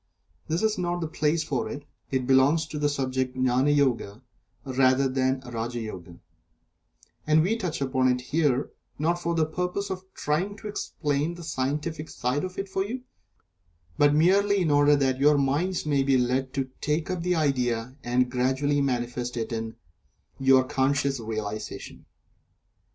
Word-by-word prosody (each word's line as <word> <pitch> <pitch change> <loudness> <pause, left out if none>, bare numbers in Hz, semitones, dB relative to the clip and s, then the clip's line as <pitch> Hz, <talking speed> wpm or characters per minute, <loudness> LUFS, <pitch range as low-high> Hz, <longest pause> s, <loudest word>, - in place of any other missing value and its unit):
This 165 +5 -1
is 215 -2 +1
not 175 0 -1
the 165 - -2
place 155 +1 0
for 140 -5 -2
it 145 0 -7 0.2
it 130 -1 -1
belongs 135 +5 +4
to 155 -1 -6
the 145 0 +2
subject 130 -2 -2
of 130 - 0
Gnani 130 +3 +3
Yoga 130 -5 0 0.4
rather 130 0 +3
than 130 0 0
to 125 - -11
Raja 120 +1 -3
Yoga 90 -6 -8 1.1
and 155 0 +5
we 205 +6 +1
touch 180 -10 -3
upon 130 -1 +1
it 125 0 +2
here, 140 0 0 0.3
not 170 +4 0
for 170 0 -1
the 160 -1 +3
purpose 180 +5 -3
of 190 0 -7
trying 180 +8 -1
to 215 - -8
explain 150 -5 -2
the 175 - -9
scientific 155 +2 -3
side 125 +4 -1
of 185 0 -5
it 195 -1 -5
to 190 - +1
you, 235 +6 -3 1.0
but 145 0 +5
merely 195 +5 +4
in 160 - +1
order 145 0 +5
that 135 -2 +1
your 145 +1 +5
minds 150 +7 0
may 145 -2 +2
be 135 -1 +3
led 130 +1 0
to 135 -2 -2
take 155 +4 -1
up 180 -2 -2
the 180 +1 +1
idea 125 -5 0
and 125 +1 +1
gradually 130 +3 +1
manifest 125 -2 -2
it 115 0 -3
in 110 0 -4 0.9
conscious 135 0 +1
realization. 110 -1 -6
140 Hz, 165 wpm, -26 LUFS, 130-160 Hz, 1.1 s, and